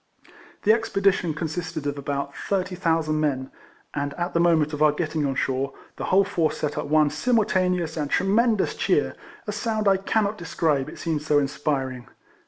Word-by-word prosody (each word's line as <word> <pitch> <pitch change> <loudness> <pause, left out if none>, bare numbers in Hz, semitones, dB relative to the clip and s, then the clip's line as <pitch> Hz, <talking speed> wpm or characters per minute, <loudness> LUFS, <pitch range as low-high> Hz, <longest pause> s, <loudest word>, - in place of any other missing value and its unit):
The 215 - +6
expedition 195 -7 +1
consisted 160 -1 -4
of 145 0 -1
about 140 0 -3
30,000 170 -5 0
men, 135 -3 -1 0.4
and 140 0 -3
at 175 +1 -3
the 170 - +2
moment 160 -3 +3
of 150 - -4
our 155 -1 +6
getting 155 -1 -1
on 135 - -2
shore, 135 +2 -1 0.2
the - - -3
whole 195 +2 +4
force 165 -5 0
set 150 -1 -2
up 150 - -3
one 155 0 +4
simulta 220 -6 +2
neous 170 -3 -1
and 145 - -3
tremendous 215 - +2
cheer, - - +1 0.3
a 210 - -3
sound 215 0 -1
I 195 -1 +5
cannot 205 +1 0
describe, 155 -5 0
it - - -10
seemed 160 -3 -2
so 150 -1 +2
inspiring. 135 -3 -1
160 Hz, 175 wpm, -24 LUFS, 145-190 Hz, 0.4 s, The